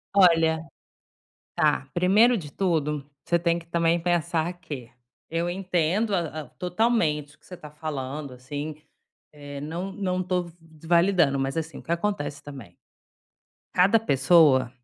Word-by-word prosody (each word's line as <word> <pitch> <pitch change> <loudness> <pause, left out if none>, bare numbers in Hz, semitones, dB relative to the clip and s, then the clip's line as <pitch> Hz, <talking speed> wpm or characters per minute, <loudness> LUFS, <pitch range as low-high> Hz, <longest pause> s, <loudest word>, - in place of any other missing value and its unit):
Olha. 165 -4 +4 0.9
Tá, 65 0 +2
primeiro 210 +7 +4
de 150 -6 -8
tudo, 150 -6 -1 0.2
você 170 - +2
tem 170 0 +1
que 170 - -12
também 170 0 +1
pensar 170 0 0
que 140 -9 -7 0.4
eu 170 +2 -1
entendo 185 +3 0
a 155 -3 -2
a - - -11
totalmente 175 -7 0
o - - -27
que - - -32
você 180 - -9
tá 150 -2 -11
falando, 145 -2 -5
assim, 145 +4 -6 0.6
eh, 145 -1 -9
não 170 +6 -5
não 185 -3 -2
tô 180 0 0
v 170 - -11
v 160 -1 -17
validando, 170 -5 +4
mas, 135 +3 -2
assim, 160 0 -4
o - - -11
que 170 - -3
acontece 170 -5 -2
também? 130 -12 -11 1.0
Cada 195 +5 +5
pessoa 140 - +4
165 Hz, 150 wpm, -25 LUFS, 145-180 Hz, 1.0 s, Cada